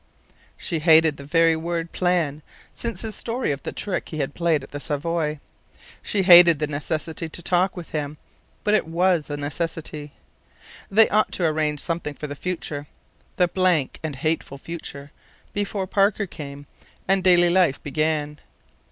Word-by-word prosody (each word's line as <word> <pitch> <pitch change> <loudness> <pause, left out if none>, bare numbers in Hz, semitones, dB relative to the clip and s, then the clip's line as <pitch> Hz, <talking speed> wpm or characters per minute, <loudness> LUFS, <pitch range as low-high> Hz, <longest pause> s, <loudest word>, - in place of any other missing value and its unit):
She 165 -4 -3
hated 160 -1 +5
the 140 - -9
very 165 +2 +3
word 165 +1 -3
"plan" 170 -5 0 0.3
since 235 -1 -4
his 220 -1 -3
story 240 - -2
of 140 0 -4
the - - -5
trick 200 - -4
he 155 - -6
had 140 -1 -2
played 165 -5 +1
at - - -12
the 145 - -5
Savoy. 150 +1 -2 0.6
She 200 -2 0
hated 175 -3 +9
the 150 - 0
necessity 155 +2 -4
to 175 - -6
talk 180 +2 +1
with 175 - -8
him; 150 -1 -3 0.5
but 210 - +2
it 215 - +2
was 170 -1 +1
a 145 - -3
necessity. 150 0 -5 0.8
They 215 +3 +6
ought 215 +1 +2
to 175 - +1
arrange 155 -2 0
something 165 -3 -3
for 150 - -6
the 145 - -5
future 150 -3 -4 0.5
the 180 - +3
blank 175 -6 +1
and 155 -3 -4
hateful 155 0 -2
future 145 -2 -8 0.4
before 205 -1 -2
Parker 200 +2 +2
came, 145 -5 -9 0.4
and 190 0 +2
daily 175 -1 +5
life 180 -6 +3
began. 150 0 -1
165 Hz, 160 wpm, -23 LUFS, 150-180 Hz, 0.8 s, hated